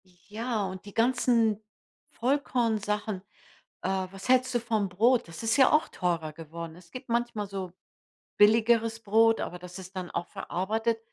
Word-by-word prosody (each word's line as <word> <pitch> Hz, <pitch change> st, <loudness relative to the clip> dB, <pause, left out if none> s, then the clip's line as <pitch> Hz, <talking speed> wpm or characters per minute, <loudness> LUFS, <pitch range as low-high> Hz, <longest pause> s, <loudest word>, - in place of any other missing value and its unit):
Ja, 210 Hz, +5 st, -4 dB
und 190 Hz, +1 st, -7 dB
die 205 Hz, -, -10 dB
ganzen 230 Hz, -3 st, +2 dB, 0.5 s
Vollkornsachen. 220 Hz, -6 st, 0 dB, 0.6 s
Äh, 190 Hz, 0 st, -1 dB
was 195 Hz, +4 st, -9 dB
hältst 255 Hz, 0 st, +4 dB
du -, -, +4 dB
vom 220 Hz, -4 st, -1 dB
Brot? 230 Hz, +6 st, +3 dB
Das 165 Hz, +5 st, -9 dB
ist 225 Hz, +3 st, +2 dB
ja 265 Hz, -2 st, +6 dB
auch 310 Hz, +2 st, +4 dB
teurer 165 Hz, -4 st, -2 dB
geworden. 165 Hz, +1 st, -8 dB
Es 175 Hz, -1 st, -17 dB
gibt 255 Hz, 0 st, -9 dB
manchmal 235 Hz, -3 st, -1 dB
so 190 Hz, -2 st, -5 dB, 0.7 s
billigeres 225 Hz, +1 st, +4 dB
Brot, 225 Hz, +2 st, +4 dB
aber 180 Hz, -, -4 dB
das 180 Hz, +1 st, -10 dB
ist 190 Hz, +1 st, -11 dB
dann 180 Hz, -1 st, -4 dB
auch 175 Hz, -, -3 dB
verarbeitet. 220 Hz, +5 st, -1 dB
215 Hz, 155 wpm, -28 LUFS, 185-235 Hz, 0.7 s, ja